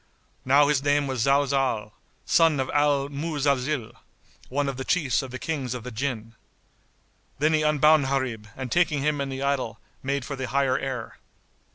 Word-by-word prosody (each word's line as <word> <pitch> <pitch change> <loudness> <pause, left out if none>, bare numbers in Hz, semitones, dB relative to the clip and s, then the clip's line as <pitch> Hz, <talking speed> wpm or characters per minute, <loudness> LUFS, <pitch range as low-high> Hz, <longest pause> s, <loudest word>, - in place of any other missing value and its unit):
Now 140 +2 +5
his 145 -2 +2
name 145 0 +2
was 130 -3 -2
Zalzál, 135 -6 +1 0.3
son 165 -4 +4
of 130 - -1
Al 145 -1 +2
Muzalzil,[FN#70] 140 -4 -1 0.6
one 140 +2 -1
of 135 -2 -3
the 130 - -4
Chiefs 145 -4 +1
of 135 - -7
the 130 - -6
Kings 135 -5 -3
of 125 - -6
the 125 - -7
Jinn. 115 -2 -4 1.0
Then 155 +3 +2
he 155 - +3
unbound 150 -1 +4
Gharib 130 -6 -2
and 130 -2 -5
taking 155 -4 +2
him 150 -1 0
and 135 -1 -3
the 135 +1 -4
idol, 130 -6 -1 0.2
made 140 -1 -2
for 140 - -5
the 130 -1 -4
higher 135 -1 +1
air. 130 -4 -5
140 Hz, 175 wpm, -25 LUFS, 130-145 Hz, 1.0 s, Now